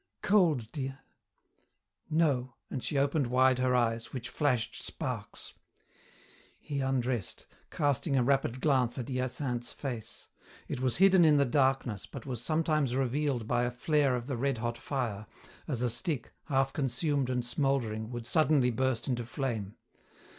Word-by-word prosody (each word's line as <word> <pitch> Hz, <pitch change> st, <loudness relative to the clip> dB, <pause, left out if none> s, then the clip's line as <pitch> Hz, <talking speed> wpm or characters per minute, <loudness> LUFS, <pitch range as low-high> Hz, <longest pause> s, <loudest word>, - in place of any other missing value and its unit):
"Cold, 160 Hz, -, +3 dB
dear?" 135 Hz, -2 st, -4 dB, 1.1 s
"No," 140 Hz, -6 st, +1 dB, 0.2 s
and 130 Hz, -, -4 dB
she 145 Hz, -, -2 dB
opened 140 Hz, 0 st, +2 dB
wide 130 Hz, +1 st, +4 dB
her 125 Hz, 0 st, +2 dB
eyes, 115 Hz, -2 st, 0 dB
which 125 Hz, -3 st, -5 dB
flashed 130 Hz, -7 st, 0 dB
sparks. -, -, -4 dB, 1.1 s
He 145 Hz, -2 st, -4 dB
undressed, 130 Hz, -5 st, -1 dB, 0.2 s
casting 145 Hz, 0 st, 0 dB
a 125 Hz, -, +4 dB
rapid 130 Hz, -1 st, +1 dB
glance 130 Hz, -5 st, +2 dB
at 125 Hz, -1 st, -4 dB
Hyacinthe's 125 Hz, -1 st, -2 dB
face. 120 Hz, -5 st, -6 dB, 0.4 s
It -, -, -4 dB
was 130 Hz, -1 st, +1 dB
hidden 190 Hz, -1 st, +6 dB
in 155 Hz, -2 st, +6 dB
the 140 Hz, -, +4 dB
darkness, 130 Hz, -5 st, +1 dB
but 135 Hz, -, -9 dB
was 125 Hz, -4 st, -4 dB
sometimes 155 Hz, -3 st, +1 dB
revealed 135 Hz, -2 st, 0 dB
by 120 Hz, 0 st, +2 dB
a 120 Hz, -, +1 dB
flare 140 Hz, +2 st, +1 dB
of 120 Hz, -1 st, -4 dB
the 130 Hz, -2 st, -3 dB
red 135 Hz, +1 st, 0 dB
hot 120 Hz, +1 st, -3 dB
fire, 115 Hz, -7 st, -3 dB, 0.4 s
as 130 Hz, -6 st, -1 dB
a -, -, +3 dB
stick, 120 Hz, +2 st, -2 dB
half 135 Hz, -2 st, +1 dB
consumed 140 Hz, 0 st, 0 dB
and 125 Hz, -1 st, -1 dB
smouldering, 120 Hz, -4 st, 0 dB
would 120 Hz, -1 st, -5 dB
suddenly 150 Hz, -4 st, +3 dB
burst 130 Hz, 0 st, 0 dB
into 125 Hz, -3 st, -1 dB
flame. 115 Hz, -5 st, -3 dB
130 Hz, 150 wpm, -30 LUFS, 120-140 Hz, 1.1 s, hidden